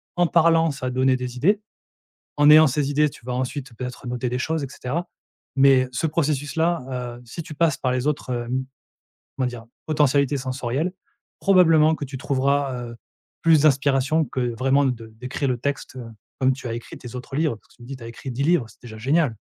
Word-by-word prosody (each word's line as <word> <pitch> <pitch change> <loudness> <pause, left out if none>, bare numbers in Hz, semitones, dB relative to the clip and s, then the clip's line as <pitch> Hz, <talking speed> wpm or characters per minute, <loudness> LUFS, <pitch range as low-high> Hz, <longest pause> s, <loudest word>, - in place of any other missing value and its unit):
En 175 - +3
parlant 165 -1 +4
ça 135 -2 -6
va - - 0
te - - -7
donner 130 0 +3
des 125 0 -5
idées. 200 - +2 0.8
En 145 0 +6
ayant 155 +1 +8
ces 140 +1 0
idées 150 +1 +3
tu 120 - -16
vas 125 - -4
ensuite 130 0 -4
peut-être, 125 +2 -7
heu, - - -4
noter 125 0 -2
des 125 - -2
choses 160 +3 -1
et - - -3
cetera, 145 +7 -4 0.5
mais 135 -2 +5
ce 120 - -1
processus-là, 145 -4 -1
heu, - - -14
si 120 +9 -7
tu 155 - -9
passes 160 -2 +2
par 130 - -1
les 130 +1 -1
autres, 150 -3 -1
hem, 125 +2 -2 0.7
comment 130 - +1
dire? 120 -2 -7 0.2
Potentialités 145 -2 +2
sensorielles, 130 +5 -2 0.5
probablement 160 -5 +5
que 150 - -6
tu 135 0 -7
trouveras, 135 -1 0
heu, - - -10 0.5
plus 160 -3 +5
d'inspiration 145 +1 +3
que 125 -3 -2
vraiment 135 +3 +3
de 120 -3 -2
d'écrire 125 +5 -4
le 125 -2 0
texte, 140 +2 -4
heu, 130 - -6 0.4
comme 130 0 +3
tu 130 -1 -7
as 115 - -3
écrit 115 - -7
tes 120 -1 -10
autres 130 +2 -7
livres. 155 -6 +1
Parce 105 - -22
que - - -23
tu - - -20
me 120 - -12
dis 135 - -6
tu 125 - -12
as - - -7
écrit 115 +3 -8
10 130 +3 -2
livres, 160 -4 +3
c'est - - -21
déjà 110 -3 -10
génial! 135 +1 +1
135 Hz, 220 wpm, -23 LUFS, 125-150 Hz, 0.8 s, ayant